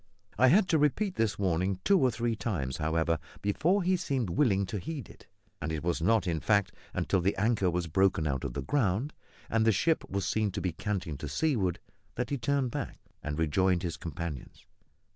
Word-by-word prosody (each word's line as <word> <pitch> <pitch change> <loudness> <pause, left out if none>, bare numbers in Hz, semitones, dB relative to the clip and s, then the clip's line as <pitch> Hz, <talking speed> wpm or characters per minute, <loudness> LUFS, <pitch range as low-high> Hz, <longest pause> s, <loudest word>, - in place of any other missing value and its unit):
I 130 +4 +5
had 185 +8 +5
to 160 - +3
repeat 180 +7 +1
this 110 - 0
warning 95 0 0
two 200 -2 +4
or 130 - +4
three 120 -1 -1
times, 80 - -2
however, 80 +1 0 0.2
before 170 - +2
he 185 +1 +3
seemed 135 - -1
willing 100 - +2
to 100 +2 -4
heed 145 - -5
it; - - -16 0.3
and 80 0 -2
it 80 -2 -3
was 85 -1 0
not 110 +5 +3
in 85 -3 0
fact 100 +2 +2 0.2
until 95 - +1
the 95 +3 +1
anchor 105 -2 +2
was 90 0 -1
broken 90 0 +2
out 65 -3 -1
of - - -3
the - - -3
ground 125 0 0 0.3
and 115 0 +1
the 110 - +5
ship 160 +9 +1
was 100 0 -2
seen 110 -1 +1
to 100 - -2
be 90 - -1
canting 90 -4 -3
to 75 - -5
seaward 100 - 0 0.4
that - - -3
he 140 - 0
turned 135 0 0
back - - -5 0.2
and 75 -1 -4
rejoined 90 +3 +2
his 85 -2 -2
companions. 85 -5 -7
100 Hz, 200 wpm, -30 LUFS, 85-125 Hz, 0.4 s, I